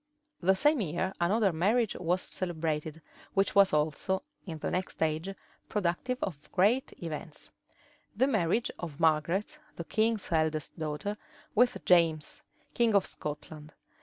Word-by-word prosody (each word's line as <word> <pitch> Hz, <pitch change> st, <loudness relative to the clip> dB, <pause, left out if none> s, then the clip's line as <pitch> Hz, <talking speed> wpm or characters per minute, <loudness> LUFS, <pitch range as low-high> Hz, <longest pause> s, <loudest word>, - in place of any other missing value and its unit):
The 190 Hz, +2 st, +4 dB
same 295 Hz, +4 st, +3 dB
year 185 Hz, +2 st, -1 dB
another 195 Hz, +2 st, +3 dB
marriage 210 Hz, +7 st, +2 dB
was 180 Hz, +1 st, 0 dB
celebrated, 160 Hz, -3 st, -3 dB, 0.3 s
which 195 Hz, 0 st, +2 dB
was 200 Hz, -1 st, +6 dB
also, 155 Hz, +5 st, 0 dB, 0.2 s
in 165 Hz, -3 st, -5 dB
the -, -, -3 dB
next 185 Hz, +1 st, -3 dB
age, 160 Hz, +3 st, -1 dB, 0.4 s
productive 210 Hz, +6 st, -1 dB
of 150 Hz, -6 st, -5 dB
great 215 Hz, +8 st, +3 dB
events; 155 Hz, -1 st, -7 dB, 0.7 s
the 260 Hz, -, +4 dB
marriage 220 Hz, -3 st, +1 dB
of 160 Hz, -4 st, -6 dB
Margaret, 165 Hz, +5 st, +1 dB, 0.2 s
the 170 Hz, -, -5 dB
king's 220 Hz, 0 st, 0 dB
eldest 155 Hz, 0 st, 0 dB
daughter, 160 Hz, +7 st, -3 dB, 0.4 s
with 245 Hz, +3 st, +2 dB
James, 165 Hz, -4 st, +3 dB, 0.3 s
king 230 Hz, -3 st, +3 dB
of 200 Hz, -, +4 dB
Scotland. 150 Hz, 0 st, -7 dB
175 Hz, 135 wpm, -30 LUFS, 155-205 Hz, 0.7 s, was